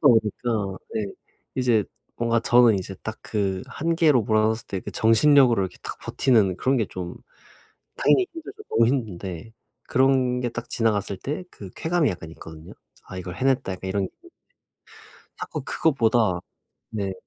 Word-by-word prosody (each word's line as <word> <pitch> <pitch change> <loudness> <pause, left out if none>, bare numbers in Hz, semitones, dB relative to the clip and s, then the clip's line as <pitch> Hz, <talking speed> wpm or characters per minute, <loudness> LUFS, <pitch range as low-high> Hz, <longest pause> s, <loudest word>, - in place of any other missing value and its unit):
보니까 110 -5 +2 0.2
네. 105 -2 -1 0.5
이제 120 -5 +2 0.3
뭔가 115 0 +1
저는 120 -2 +5
이제 95 +1 -6
딱 110 0 -5
그 95 -3 -1
한계로 160 -6 +2
몰아 110 +1 +2
넣었을 110 +1 0
때 95 - -4
그 - - -7
정신력으로 120 -1 +5
이렇게 95 - -4
딱 - - -6
버티는 105 -8 +2
그런 135 +1 +1
게 110 -4 +1
좀 90 -2 -6 0.8
당연히 375 - +4
힘들죠, 335 +6 -9
너무 115 - +4
힘든데 100 -6 -3 0.4
그런 130 -1 +3
게 120 - -1
딱 120 +1 -7
지나갔을 105 -4 0
때 150 - -4
그 100 -3 -10
쾌감이 165 -2 +1
약간 85 -3 -6
있거든요. 80 -1 -11 0.3
'아 95 - -9
이걸 90 -1 -6
해냈다.' 130 -6 +1
약간 95 +1 -7
이런 100 +1 0
게 - - -20
있는데 350 +1 -20 1.0
자꾸 - - -5
그것보다 115 - +2 0.5
네. 100 -3 -2
115 Hz, 315 characters per minute, -24 LUFS, 95-130 Hz, 1.0 s, 저는